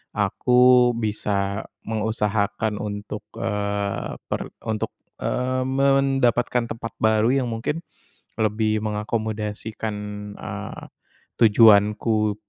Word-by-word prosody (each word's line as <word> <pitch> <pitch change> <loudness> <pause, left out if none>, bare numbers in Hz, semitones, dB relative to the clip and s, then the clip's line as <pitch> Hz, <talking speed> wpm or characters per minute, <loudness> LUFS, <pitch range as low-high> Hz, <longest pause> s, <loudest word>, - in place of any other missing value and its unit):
aku 125 +4 +4
bisa 105 -2 -1 0.2
mengusahakan 105 -1 -1
untuk, 105 0 -5
eee, 100 -1 -2 0.2
per - - -1 0.3
untuk 110 - -2 0.3
eee 130 +1 -1
mendapatkan 135 -3 +2
tempat 115 0 -6
baru 110 0 +3 0.2
yang 125 - -3
mungkin 120 +9 -3 0.6
lebih 110 0 +1
mengakomodasikan, 110 0 -3 0.4
eee, - - -6 0.6
tujuanku 105 -1 +5
110 Hz, 80 wpm, -23 LUFS, 105-120 Hz, 0.6 s, tujuanku